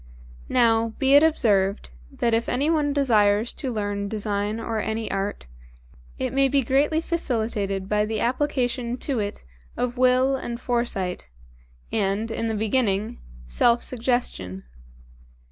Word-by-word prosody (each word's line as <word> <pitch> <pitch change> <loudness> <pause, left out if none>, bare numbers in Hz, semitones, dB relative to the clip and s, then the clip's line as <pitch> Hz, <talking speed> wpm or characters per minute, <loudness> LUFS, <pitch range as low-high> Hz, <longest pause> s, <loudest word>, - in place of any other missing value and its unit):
Now, 230 -2 +2
be 270 0 +3
it 285 - +8
observed, 205 - +2 0.2
that 235 - 0
if 230 +1 +1
anyone 290 +3 +1
desires 220 -6 +2
to 265 -4 -4
learn 205 -2 -2
design 210 0 -2
or 225 -1 -3
any 220 +1 -3
art, 195 +1 -3 0.7
it - - -2
may 275 0 +4
be 275 0 +2
greatly 285 +6 +2
facilitated 220 - -2
by 210 +1 +1
the 220 0 -2
application 250 -1 -1
to 265 -2 -2
it 205 - -4 0.3
of 245 0 -2
Will 255 +1 +4
and 235 -2 -5
Foresight, 235 - -2 0.6
and 200 +3 0
in 230 0 -2
the 220 - -1
beginning, 215 0 0 0.3
Self 235 - +2
Suggestion. 235 - -2
230 Hz, 130 wpm, -24 LUFS, 205-255 Hz, 0.7 s, it